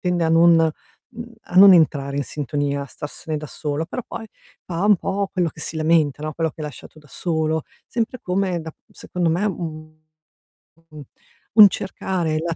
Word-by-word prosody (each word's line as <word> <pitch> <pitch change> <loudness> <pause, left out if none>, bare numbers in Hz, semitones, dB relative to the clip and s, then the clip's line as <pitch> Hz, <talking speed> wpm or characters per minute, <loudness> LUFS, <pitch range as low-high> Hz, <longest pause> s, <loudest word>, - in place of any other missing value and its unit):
tende 180 -2 0
a 160 - +1
non 165 +1 +6 0.6
mhmm, 235 -1 -10
a 180 - -8
non 195 0 +10
entrare 140 -5 +2
in 145 - 0
sintonia, 145 0 -2
a - - -8
starsene 150 +3 -6
da 150 - -7
solo, 150 +2 -4
però 250 +8 -5
poi 225 - -7 0.4
fa 175 +1 -3
un 205 -1 +5
po' 195 +3 -2
quello 180 -3 0
che - - -12
si 160 - -5
lamenta, 155 -3 +2
no, 155 0 -3
quello 165 +1 -1
che 155 - -15
hai 150 - -3
lasciato 150 +2 -13
da 150 - -21
solo, 160 0 -1 0.2
sempre 235 +2 -3
come 185 -1 -1
da 160 0 -8 0.2
secondo 175 -2 -3
me, 175 +5 0
un 155 -4 -6 0.9
u- 150 -2 -10 0.5
un 215 -2 +10
cercare 180 -5 -2
la 165 +1 -2
165 Hz, 185 wpm, -21 LUFS, 155-185 Hz, 0.9 s, non